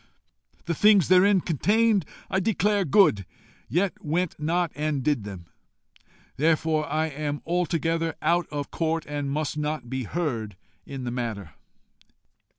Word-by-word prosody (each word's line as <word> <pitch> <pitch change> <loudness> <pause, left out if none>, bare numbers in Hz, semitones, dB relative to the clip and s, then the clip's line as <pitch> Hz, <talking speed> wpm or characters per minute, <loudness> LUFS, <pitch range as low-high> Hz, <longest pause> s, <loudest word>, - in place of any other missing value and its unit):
The 170 - -1
things 205 -1 +5
therein 185 +1 +5
contained 205 - +2 0.2
I 190 - 0
declare 205 0 +1
good, 145 - +4 0.5
yet 180 +2 -1
went 165 +3 0
not 165 +2 0
and 150 -2 -2
did 140 -8 0
them. 95 -4 -8 0.9
Therefore 155 0 +1
am 150 -1 -1
I - - -11
altogether 165 -1 0
out 170 +1 +1
of 145 -1 -5
court, 165 -1 -1
and 145 -1 -3
must 150 +1 -2
not 150 -5 -3
be 130 -2 -2
heard 115 - -3 0.3
in 135 -2 -6
the 120 - -3
matter. 115 -5 -4
155 Hz, 135 wpm, -25 LUFS, 140-175 Hz, 0.9 s, things